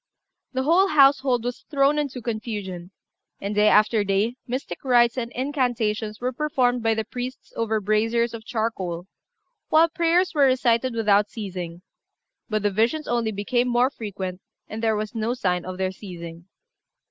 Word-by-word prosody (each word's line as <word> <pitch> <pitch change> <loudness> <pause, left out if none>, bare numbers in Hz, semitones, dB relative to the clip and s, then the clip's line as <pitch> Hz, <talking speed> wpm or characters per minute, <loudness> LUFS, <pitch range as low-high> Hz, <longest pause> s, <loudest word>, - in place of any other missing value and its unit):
The 260 0 0
whole 345 +7 +4
household 275 -6 +4
was 245 0 -4
thrown 285 0 +3
into 270 -5 -4
confusion, 205 -6 -5 0.5
and 200 +1 -3
day 210 +1 +4
after 215 0 +4
day 200 +4 0
mystic 255 +3 -5
rites 240 -2 +4
and 240 -2 -3
incantations 240 -6 -1
were 250 +1 -1
performed 250 -3 +1
by 225 0 +2
the 220 - -1
priests 250 +3 -7
over 220 -1 0
braziers 225 +3 +1
of 225 -1 -7
charcoal, 195 -7 -3 0.6
while 325 +2 +5
prayers 340 +2 +2
were 290 -3 +4
recited 255 -1 +2
without 210 -2 +3
ceasing; 180 -5 -6 0.7
but 215 -1 -1
the 205 - +2
visions 235 +10 0
only 235 -2 0
became 240 +5 0
more 245 +2 +2
frequent, 195 -6 -6 0.3
and 220 +1 -6
there 220 -1 +2
was 210 0 -3
no 225 +2 -1
sign 180 -7 -1
of 185 0 -6
their 190 0 -1
ceasing. 170 -3 -10
230 Hz, 160 wpm, -24 LUFS, 205-255 Hz, 0.7 s, while